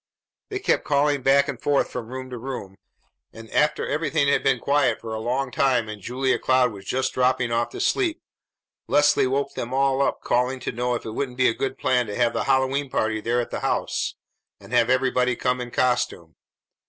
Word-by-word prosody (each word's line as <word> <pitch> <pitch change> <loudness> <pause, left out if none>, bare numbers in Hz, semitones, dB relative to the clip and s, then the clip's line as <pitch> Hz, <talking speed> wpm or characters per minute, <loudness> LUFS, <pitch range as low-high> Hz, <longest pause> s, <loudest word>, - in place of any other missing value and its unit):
They 400 - -3
kept 390 - +1
calling 145 -1 +1
back 140 +2 +4
and 135 -5 -5
forth 145 -1 +1
from 120 -3 -5
room 130 +1 -7
to 125 - -6
room, 120 -6 -6 0.6
and 115 0 -12
after 150 0 +1
everything 155 -1 0
had - - +3
been 135 -2 +2
quiet 135 -2 +1
for 115 -1 -6
a 110 - -3
long 125 +3 -2
time 125 -3 +2
and 105 -1 -8
Julia 130 +5 0
Cloud 130 -1 +3
was 100 -2 -11
just 130 +1 -1
dropping 125 -1 +1
off 115 0 0
to - - -8
sleep, 345 -5 +1 0.7
Leslie 145 -2 +4
woke 140 +2 -1
them 120 +2 -4
all 135 0 +2
up 140 - 0
calling 125 +2 0
to - - -3
know 125 +1 -1
if - - -6
it 110 - -5
wouldn't 125 +2 -4
be 130 - +4
a - - 0
good 135 +2 -3
plan 125 -2 +1
to 105 - -5
have 120 -1 +2
the - - -1
Hallowe'en 135 +1 +1
party 110 -3 -1
there 120 +2 0
at 120 - -7
the - - -3
house - - -1 0.4
and - - -13
have 115 - +3
everybody 125 -1 +2
come 125 +1 -1
in 120 - -5
costume. 120 -10 -1
130 Hz, 210 wpm, -24 LUFS, 120-135 Hz, 0.7 s, back